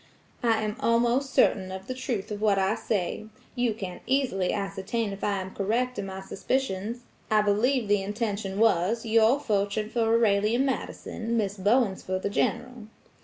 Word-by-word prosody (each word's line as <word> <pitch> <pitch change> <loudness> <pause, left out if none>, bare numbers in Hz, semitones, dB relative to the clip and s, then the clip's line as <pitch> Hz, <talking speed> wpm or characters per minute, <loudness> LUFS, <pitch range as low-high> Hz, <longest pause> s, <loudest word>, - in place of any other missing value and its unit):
"I 225 -2 +2
am 215 +1 -3
almost 240 +2 +2
certain 190 -8 +3
of 190 0 -7
the 255 - -4
truth 235 -5 -3
of 205 0 -4
what 210 -2 +3
I 195 +2 +2
say; 215 -1 -2 0.3
you 245 -3 0
can 185 -4 -6
easily 255 -9 +1
ascertain 200 +2 -2
if 195 - -9
I 200 -1 0
am 190 0 -8
correct 240 +6 -1
in 195 - -3
my 190 0 -6
suspicions. 225 +2 -2 0.3
I 215 -1 +4
believe 225 +4 +2
the 205 -1 +3
intention 205 -1 -3
was, 225 +1 +2
your 225 +4 +4
fortune 210 -3 -1
for 235 - 0
Aurelia 215 -1 +3
Madison, 240 -3 -2
Miss 205 -3 0
Bowen's 205 +1 +2
for 185 0 -2
the 195 +2 -3
General." 245 +1 -1
215 Hz, 170 wpm, -27 LUFS, 195-235 Hz, 0.3 s, I